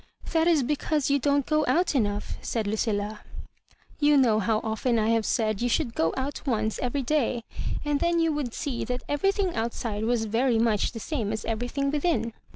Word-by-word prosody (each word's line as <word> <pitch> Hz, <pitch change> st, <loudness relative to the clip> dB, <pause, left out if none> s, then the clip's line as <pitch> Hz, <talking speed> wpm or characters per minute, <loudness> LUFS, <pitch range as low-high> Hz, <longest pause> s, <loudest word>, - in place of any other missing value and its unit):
" -, -, -11 dB
That 325 Hz, 0 st, +3 dB
is 320 Hz, -5 st, +4 dB
because 295 Hz, +1 st, 0 dB
you 280 Hz, -, +3 dB
don't 285 Hz, 0 st, +2 dB
go 305 Hz, 0 st, +2 dB
out 355 Hz, 0 st, +2 dB
enough," 205 Hz, -6 st, -1 dB
said 225 Hz, -2 st, -2 dB
Lucilla. 210 Hz, 0 st, -1 dB, 0.4 s
" -, -, -31 dB
You 295 Hz, -, +6 dB
know 230 Hz, -5 st, +4 dB
how 220 Hz, +1 st, +1 dB
often 225 Hz, +2 st, 0 dB
I 220 Hz, 0 st, +2 dB
have 225 Hz, -1 st, +2 dB
said 215 Hz, -3 st, 0 dB
yQu 245 Hz, -, 0 dB
should 240 Hz, -1 st, 0 dB
go 165 Hz, -6 st, +1 dB
out 270 Hz, +2 st, -3 dB
once 220 Hz, -3 st, 0 dB
every 260 Hz, +2 st, -1 dB
day; 250 Hz, -4 st, 0 dB, 0.4 s
and 295 Hz, -1 st, +1 dB
then 340 Hz, 0 st, +2 dB
you 330 Hz, -1 st, +2 dB
would 290 Hz, -5 st, -2 dB
see 275 Hz, -6 st, -3 dB
that 250 Hz, 0 st, -3 dB
everything 390 Hz, +5 st, +1 dB
outside 225 Hz, -1 st, -2 dB
was 235 Hz, -1 st, +1 dB
very 230 Hz, +2 st, +2 dB
much 225 Hz, -2 st, +1 dB
the 225 Hz, -, -6 dB
same 225 Hz, -5 st, -2 dB
as 220 Hz, -, -4 dB
everything 245 Hz, +5 st, -1 dB
within." 295 Hz, -6 st, 0 dB
245 Hz, 200 wpm, -26 LUFS, 220-290 Hz, 0.4 s, You